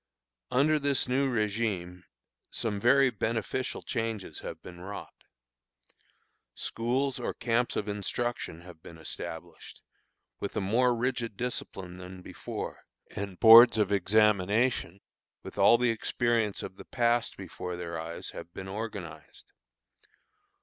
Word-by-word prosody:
Under 145 +5 +3
this 140 -1 0
new 135 +1 +1
régime 100 -5 -1 0.4
some 105 -3 -2
very 130 +4 +5
beneficial 115 +4 -2
changes 115 - -3
have - - -7
been 85 -1 -10
wrought. 100 +2 -9 1.3
Schools 130 +3 -1
or 120 - -3
camps 120 +1 0
of 105 - -2
instruction 105 -3 -3
have 85 -2 -13
been 85 - -12
established, 80 - -8 0.6
with 100 - -4
a - - +3
more 120 +5 +2
rigid 115 -3 -2
discipline 95 -7 -4
than 90 0 -10
before, - - -6 0.3
and 100 -3 -5
boards 115 +1 +10
of 105 -2 +2
examination, 105 0 +2 0.4
with - - -8
all 120 - +7
the 120 0 +2
experience 115 -1 0
of 95 - -7
the - - -11
past 120 -1 +1
before 90 -1 -6
their 85 -2 -5
eyes, 80 +1 -6
have 85 - -9
been 95 - -6
organized. 100 -5 -7
110 Hz, 125 wpm, -29 LUFS, 95-120 Hz, 1.3 s, boards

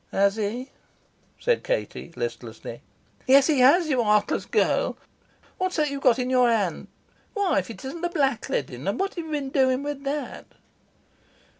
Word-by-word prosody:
"Has 200 +1 +2
he?" 225 +5 -3 0.7
said 485 -1 0
Katie - - -3
listlessly. 475 - -6 0.5
"Yes 270 +1 +7
he 295 -3 +2
has, 295 +7 +6
you 260 -5 +2
heartless 210 -1 +2
girl. - - +1 0.6
What's 370 0 -1
that 300 -2 +1
you've 280 -1 -4
got 255 -3 +4
in 250 0 -2
your 250 -1 +4
hand? 205 -8 0 0.5
Why, 400 - +2
if 185 - -6
it 230 +4 -9
isn't 315 +6 -6
the 350 - 0
black 280 -8 0
leading! 130 +2 -3
And 200 +4 -1
what 390 0 -1
have 340 - -5
you - - -9
been 285 -3 -3
doing 260 0 +2
with 290 -1 -5
that?" 290 +1 -4
270 Hz, 170 wpm, -25 LUFS, 230-310 Hz, 0.7 s, Yes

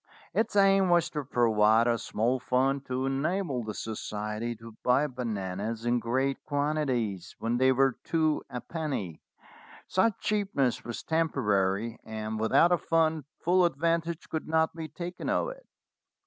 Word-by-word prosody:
Its 220 - 0
aim 195 -1 +5
was 175 -2 +3
to 150 -2 -3
provide 115 -3 +3
a 120 -1 +3
small 115 +3 -1
fund 135 +2 +1
to 130 +1 -1
enable 140 0 -1
the 110 -1 -5
society 110 +1 -4
to 115 0 -12
buy 125 +4 +3
bananas 110 -4 -4
in 120 0 +2
great 130 +4 -1
quantities 135 - -1
when 115 +1 -1
they 130 0 +5
were 135 -1 +2
two 155 -2 +1
a 125 -2 -4
penny. 135 - -4 0.7
Such 205 +3 +2
cheapness 195 - 0
was 120 - -6
temporary, 115 -9 0
and 110 0 -4
without 110 +10 +4
a 175 - +3
fund 160 -3 +1 0.2
full 180 +2 +3
advantage 170 +1 0
could 160 - -4
not 160 0 +1
be 160 -1 -5
taken 175 +2 -6
of - - +1
it. - - -11
130 Hz, 150 wpm, -29 LUFS, 115-160 Hz, 0.7 s, aim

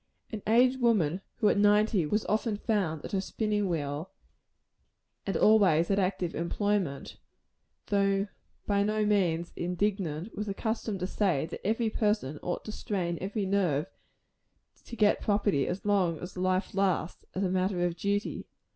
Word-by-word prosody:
An 215 -2 -5
aged 250 +3 +4
woman, 195 -7 +2
who 215 -3 +3
at - - +2
ninety 205 -4 +3
was 210 +6 0
often 215 0 0
found 190 -9 -1
at - - -7
her 195 - 0
spinning 210 0 -1
wheel, 150 +1 -3 1.2
and 195 - 0
always 190 -6 +4
at 195 - +2
active 185 -2 -1
employment 180 -4 -1 0.7
though 195 0 +1 0.4
by 200 -1 +2
no 215 +1 +1
means 175 -5 +1
indigent 180 0 -2
was 210 0 -3
accustomed 220 -1 -3
to - - 0
say, 185 -6 0
that 165 - -8
every 220 +2 0
person 210 - 0
ought 175 - -3
to 215 - -5
strain 175 -5 -3
every 200 +2 -2
nerve 180 -7 +1 1.0
to 235 - -8
get 210 -2 +3
property 205 -8 +1
as 180 +3 -4
long 190 -5 +2
as 180 +4 -8
life 185 +1 0
lasts, 190 -3 0
as 190 - 0
a 185 - +1
matter 185 -1 +1
of 175 -1 -1
duty. 200 +3 -2
195 Hz, 155 wpm, -29 LUFS, 175-210 Hz, 1.2 s, aged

